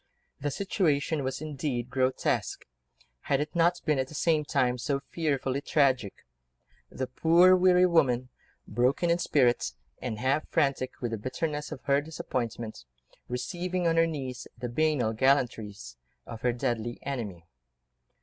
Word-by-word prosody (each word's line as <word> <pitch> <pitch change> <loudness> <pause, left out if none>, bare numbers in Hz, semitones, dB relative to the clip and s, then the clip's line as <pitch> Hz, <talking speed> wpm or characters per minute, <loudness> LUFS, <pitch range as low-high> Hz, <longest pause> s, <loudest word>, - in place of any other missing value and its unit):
The 145 - -1
situation 155 -4 0
was 130 +2 -3
indeed 135 -5 -3
grotesque, 130 0 0 0.6
had 140 - +3
it 150 +3 -3
not 175 +1 +3
been 150 -3 +2
at 130 - 0
the 155 - -11
same 155 0 +2
time 125 -3 +1
so 140 +3 -1
fearfully 140 -4 -1
tragic: 130 -9 +1 0.6
the 130 - -3
poor, 170 +8 +5
weary 180 0 +5
woman, 130 -8 +2 0.4
broken 130 +9 +1
in 170 - +2
spirit, 125 - +2 0.3
and 115 -4 -3
half 135 +6 0
frantic 135 -2 0
with 120 -2 -2
the 115 - -3
bitterness 150 - -3
of 155 - -7
her 140 0 +3
disappointment, 120 - -4 0.5
receiving 175 +8 -2
on 165 -1 +3
her 165 0 +5
knees 135 -6 -5
the 125 +1 -4
banal 140 -4 +1
gallantries 110 - 0 0.3
of 115 -1 -8
her 125 - +2
deadly 120 -1 -2
enemy. 105 -11 -5
135 Hz, 140 wpm, -28 LUFS, 125-155 Hz, 0.6 s, poor